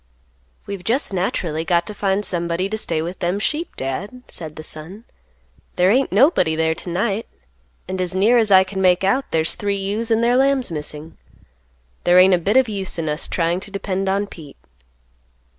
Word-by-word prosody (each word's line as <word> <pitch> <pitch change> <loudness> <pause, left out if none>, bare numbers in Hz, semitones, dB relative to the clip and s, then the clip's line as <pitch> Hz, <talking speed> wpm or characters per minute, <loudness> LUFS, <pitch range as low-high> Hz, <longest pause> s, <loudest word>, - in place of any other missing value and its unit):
"We've 200 -3 -6
just 235 0 0
naturally 170 -4 -1
got 170 0 +1
to 210 - -6
find 200 0 0
somebody 175 +1 -1
to 215 - -2
stay 160 -6 0
with 175 +3 -6
them 180 +1 0
sheep, 305 +10 -2
Dad," 200 - -5
said 155 -3 -7
the 155 - -8
son; 165 +8 -7 0.7
"there 180 +2 +4
ain't 265 +4 +2
nobody 205 - +3
there 160 0 +1
to 170 - -8
night, 200 +5 -1 0.6
and 185 0 -3
as 180 0 -2
near 220 +6 +4
as 220 -2 +2
I 190 -1 +7
can 190 0 -5
make 180 0 +3
out 255 +8 +2
there's 160 0 +1
three 200 -1 -2
ewes 205 +4 -2
and 225 0 +2
their 240 +1 +3
lambs 270 -4 +2
missing. 150 0 -6 0.8
There 175 +1 +4
ain't 185 +1 +7
a 180 - +3
bit 200 +8 +1
of 260 -1 +4
use 195 -4 -3
in 165 -1 -2
us 150 +1 -1
trying 170 +1 0
to 200 - -9
depend 195 -1 -2
on 200 +1 0
Pete." 155 -8 -12
190 Hz, 190 wpm, -20 LUFS, 170-210 Hz, 0.8 s, I